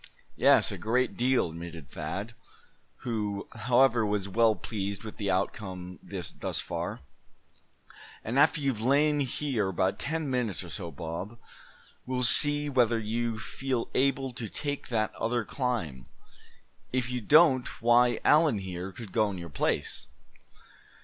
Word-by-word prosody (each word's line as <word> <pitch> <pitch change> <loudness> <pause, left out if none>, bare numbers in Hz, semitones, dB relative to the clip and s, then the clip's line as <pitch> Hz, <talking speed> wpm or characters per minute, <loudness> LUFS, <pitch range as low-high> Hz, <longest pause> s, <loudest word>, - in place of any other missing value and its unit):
"Yes, - - +4
a - - -6
great 125 +3 0
deal," 125 -8 +2
admitted 85 -3 -8
Thad, 105 +5 -5 0.7
who, 105 -5 -3
however, 125 -1 +3
was 105 -2 -1
well 110 +2 +3
pleased 100 +2 -4
with 110 - -8
the 100 -2 -2
outcome 95 -1 -3
thus 90 -4 -4
far; - - -4 1.2
"and 120 +5 0
after 150 +2 +4
you've 135 -6 -1
lain 145 +4 +3
here 130 -5 -1
about 95 +1 0
ten 160 0 -2
minutes 125 -8 -1
or 85 - -9
so, 90 -5 -4
Bob, 85 +8 -6 0.7
we'll 125 0 -1
see 145 +5 +6
whether 120 -4 +2
you 115 +1 -2
feel 130 +2 -3
able 135 -1 +1
to 120 -4 -6
take 145 +5 -4
that 110 -3 -1
other 120 0 -1
climb. 100 - -3 0.8
If 125 -1 -1
you 125 -1 -2
don't 140 +1 +5
why, 120 0 +4
Allan 150 -6 +5
here 95 -1 -5
could 105 +1 -10
go 110 -2 +2
in 95 - -5
your 85 -1 -7
place." 70 - -2
115 Hz, 140 wpm, -28 LUFS, 95-130 Hz, 1.2 s, see